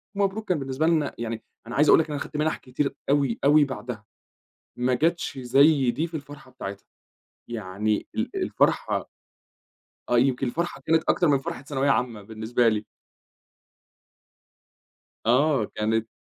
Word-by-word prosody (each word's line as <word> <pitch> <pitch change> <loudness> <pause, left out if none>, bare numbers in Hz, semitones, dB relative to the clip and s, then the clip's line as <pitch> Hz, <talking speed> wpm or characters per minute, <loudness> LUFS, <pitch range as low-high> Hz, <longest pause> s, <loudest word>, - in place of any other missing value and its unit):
مبروك" 200 +2 -1
كان 180 -4 +2
بالنسبة 135 +3 -1
لنا 155 -4 +1
يعني، 115 -1 -4 0.2
أنا 120 - -6
عايز 150 +2 +4
أقول - - +8
لك 160 - 0
أنا 150 - -2
أخدت 150 - -6
منح 155 +1 0
كتير 135 +2 -3
أوي، 140 -5 +2
أوي 145 +2 +6
بعدها، 125 -5 -6 0.7
ما 125 +1 +1
جاتش 165 +1 0
زي 135 +1 +4
دي 150 +8 -2
في 170 - -19
الفرحة 145 -2 -12
بتاعتها، 100 -6 -7 0.6
يعني 105 -1 -2
ال - - -1
الفرحة. - - +1 1.0
آه 120 - +3
يمكن 130 +1 +2
الفرحة 165 +2 -3
كانت 160 0 +3
أكتر 175 - +3
من 145 -2 +4
فرحة 135 - -6
ثانوية 140 -1 0
عامة 120 -4 0
بالنسبة 110 +3 0
لي. 110 -1 +1 2.4
آه، 130 +1 +3
كانت 110 +1 0
135 Hz, 145 wpm, -25 LUFS, 115-150 Hz, 2.4 s, أقول